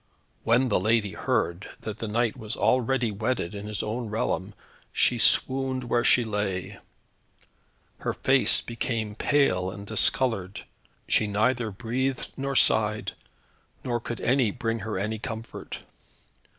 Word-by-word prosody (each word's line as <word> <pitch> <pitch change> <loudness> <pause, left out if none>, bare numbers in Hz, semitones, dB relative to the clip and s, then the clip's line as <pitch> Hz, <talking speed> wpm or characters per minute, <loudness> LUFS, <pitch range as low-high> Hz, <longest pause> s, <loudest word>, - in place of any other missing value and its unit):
When 125 +3 +3
the 105 - +2
lady 110 0 +1
heard 85 +1 -1
that 110 0 -6
her 115 - -2
knight 115 +1 0
was 110 -3 -6
already 125 -2 +1
wedded 110 -2 -2
in 105 0 -6
his 105 -1 -3
own 115 +1 -3
realm, 105 -2 -2 0.4
she - - +2
swooned 130 -1 +4
where 120 0 +1
she 120 0 +4
lay. 105 -4 -3 1.2
Her - - -2
face - - +4
became 115 -2 -3
pale 105 -7 +1
and 100 +2 -8
discoloured; 105 -2 0 0.4
she 110 - +2
neither 110 +3 +1
breathed 125 +6 -2
nor 140 0 -3
sighed, 110 -3 +3 0.7
nor 120 -1 -1
could 120 0 -6
any 125 -1 +2
bring 115 +2 -2
her 105 0 -4
any 105 +3 -2
comfort. 115 -1 -6
110 Hz, 135 wpm, -26 LUFS, 105-125 Hz, 1.2 s, swooned